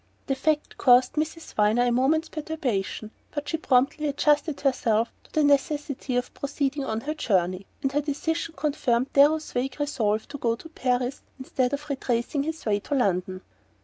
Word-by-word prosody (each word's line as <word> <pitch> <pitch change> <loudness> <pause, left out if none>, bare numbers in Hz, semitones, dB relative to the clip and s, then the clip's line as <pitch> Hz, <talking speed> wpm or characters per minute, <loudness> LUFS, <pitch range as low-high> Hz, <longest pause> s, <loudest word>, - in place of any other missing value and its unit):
The 270 - 0
fact 300 +2 -1
caused 250 0 +5
Miss 315 +1 -3
Viner 215 +3 +3
a 245 - +2
moment's 280 +7 +2
perturbation; 255 -10 -3 0.2
but 290 -1 -5
she 320 - -1
promptly 280 +1 +2
adjusted 295 +1 +1
herself 230 -5 +1
to - - -22
the 310 - +2
necessity 285 -2 +1
of 245 0 -1
proceeding 280 0 -2
on 220 -4 -2
her 300 +5 -3
journey, 185 - 0 0.2
and 270 - +1
her 290 +2 +1
decision 320 +3 -2
confirmed 265 -4 0
Darrow's 305 +3 +4
vague 255 +3 -2
resolve 220 -7 0
to 285 0 -7
go 230 -2 +1
to 325 +7 -12
Paris 250 -3 -1 0.2
instead 260 -1 -1
of 290 +1 -4
retracing 265 -1 -1
his 320 +2 -4
way 205 -2 +2
to 285 - -3
London. 185 -6 0
275 Hz, 170 wpm, -26 LUFS, 240-295 Hz, 0.2 s, caused